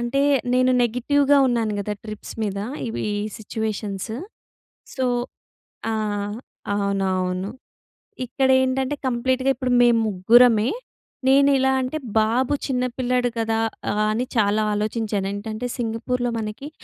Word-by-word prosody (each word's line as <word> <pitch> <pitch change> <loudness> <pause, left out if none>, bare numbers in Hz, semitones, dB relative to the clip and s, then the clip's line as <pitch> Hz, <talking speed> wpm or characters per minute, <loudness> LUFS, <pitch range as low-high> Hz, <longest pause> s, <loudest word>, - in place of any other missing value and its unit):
అంటే 240 +4 0 0.3
నేను 255 0 +4
నెగెటివ్‌గా 280 +4 +3
ఉన్నాను 230 -3 0
కదా! 210 +1 -3
ట్రిప్స్ 215 -1 -8
మీద. 200 -2 -2 0.3
ఇవి 225 - -3 0.3
సిట్యుయేషన్స్. 215 -1 -4 0.8
సో 260 -1 0 0.9
ఆ! - - -1 0.8
అవునవును. 190 -1 -1 0.7
ఇక్కడేంటంటే 260 +2 +2
కంప్లీట్‌గా 260 +2 +1
ఇప్పుడు 255 -1 -2
మేము 240 -1 +5
ముగ్గురమే. 225 +4 +5 0.6
నేనెలా 270 -1 +5
అంటే 260 +4 -3 0.2
బాబు 240 +5 +2
చిన్న 250 -2 0
పిల్లాడు 250 -1 +1
కదా! 225 0 0 0.5
అని 235 +4 0
చాలా 210 0 +3
ఆలోచించాను. 210 -1 -1
ఏంటంటే 215 +3 -4
సింగపూర్‌లో 240 +1 -1
మనకి 220 +6 -5
235 Hz, 105 wpm, -23 LUFS, 215-255 Hz, 0.9 s, మేము